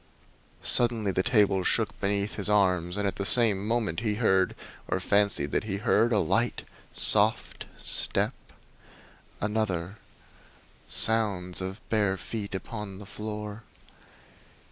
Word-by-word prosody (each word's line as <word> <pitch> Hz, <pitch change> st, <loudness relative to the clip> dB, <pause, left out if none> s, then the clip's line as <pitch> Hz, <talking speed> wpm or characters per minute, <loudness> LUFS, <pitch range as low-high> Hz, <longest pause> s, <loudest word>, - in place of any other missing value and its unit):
Suddenly 115 Hz, -4 st, +3 dB
the 95 Hz, -, 0 dB
table 100 Hz, -3 st, +2 dB
shook -, -, +1 dB
beneath 100 Hz, +1 st, -1 dB
his 100 Hz, 0 st, -1 dB
arms, 90 Hz, -3 st, +1 dB
and 100 Hz, 0 st, 0 dB
at 100 Hz, -, -4 dB
the 100 Hz, -, -3 dB
same 105 Hz, -2 st, +4 dB
moment 110 Hz, -8 st, -1 dB
he 105 Hz, -2 st, -1 dB
heard, 95 Hz, -5 st, +1 dB, 0.3 s
or -, -, -1 dB
fancied 100 Hz, -8 st, +1 dB
that -, -, -1 dB
he 100 Hz, -2 st, -3 dB
heard, 115 Hz, +2 st, +2 dB
a 110 Hz, -, +3 dB
light, 80 Hz, -6 st, 0 dB, 0.3 s
soft -, -, +2 dB
step -, -, -1 dB, 1.1 s
another 105 Hz, -3 st, -2 dB, 0.9 s
sounds 100 Hz, -5 st, +1 dB
as 95 Hz, -, -2 dB
of 95 Hz, +3 st, -14 dB
bare 100 Hz, -3 st, +1 dB
feet 100 Hz, -1 st, -6 dB
upon 105 Hz, -1 st, -7 dB
the 105 Hz, -, -11 dB
floor! 105 Hz, +1 st, -7 dB
105 Hz, 130 wpm, -27 LUFS, 95-110 Hz, 1.1 s, same